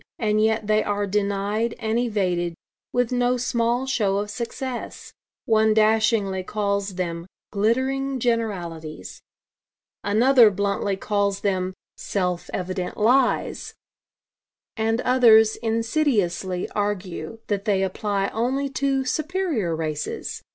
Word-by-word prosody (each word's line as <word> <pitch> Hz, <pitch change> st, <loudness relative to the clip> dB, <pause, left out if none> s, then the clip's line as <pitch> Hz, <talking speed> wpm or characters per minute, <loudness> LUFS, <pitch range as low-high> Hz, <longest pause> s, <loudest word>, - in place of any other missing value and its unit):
And 215 Hz, -2 st, +1 dB
yet 220 Hz, 0 st, +1 dB
they 215 Hz, 0 st, +2 dB
are 205 Hz, 0 st, -1 dB
denied 205 Hz, +3 st, -1 dB
and 225 Hz, 0 st, -1 dB
evaded, 180 Hz, -7 st, 0 dB, 0.4 s
with 245 Hz, -1 st, 0 dB
no 245 Hz, 0 st, +2 dB
small 240 Hz, 0 st, 0 dB
show 210 Hz, -7 st, +1 dB
of 205 Hz, +1 st, -3 dB
success. 240 Hz, +3 st, -6 dB, 0.3 s
One 220 Hz, -1 st, +3 dB
dashingly 215 Hz, -3 st, +2 dB
calls 200 Hz, 0 st, -2 dB
them 170 Hz, -1 st, -3 dB, 0.2 s
'glittering 260 Hz, +6 st, 0 dB
generalities.' 180 Hz, -10 st, -3 dB, 0.8 s
Another 230 Hz, +3 st, +5 dB
bluntly 200 Hz, 0 st, -1 dB
calls 200 Hz, -1 st, 0 dB
them 185 Hz, -2 st, -1 dB, 0.2 s
'self 180 Hz, -3 st, -2 dB
evident 185 Hz, 0 st, -4 dB
lies.' 245 Hz, +4 st, +1 dB, 1.0 s
And 225 Hz, +1 st, 0 dB
others 225 Hz, -4 st, +5 dB
insidiously 225 Hz, -, 0 dB
argue 205 Hz, -3 st, -3 dB
that 200 Hz, -1 st, -2 dB
they 195 Hz, -3 st, +2 dB
apply 195 Hz, +1 st, -1 dB
only 265 Hz, +5 st, -1 dB
to 270 Hz, 0 st, 0 dB
'superior 310 Hz, -, -1 dB
races.' 155 Hz, -2 st, -4 dB
215 Hz, 110 wpm, -23 LUFS, 195-235 Hz, 1.0 s, Another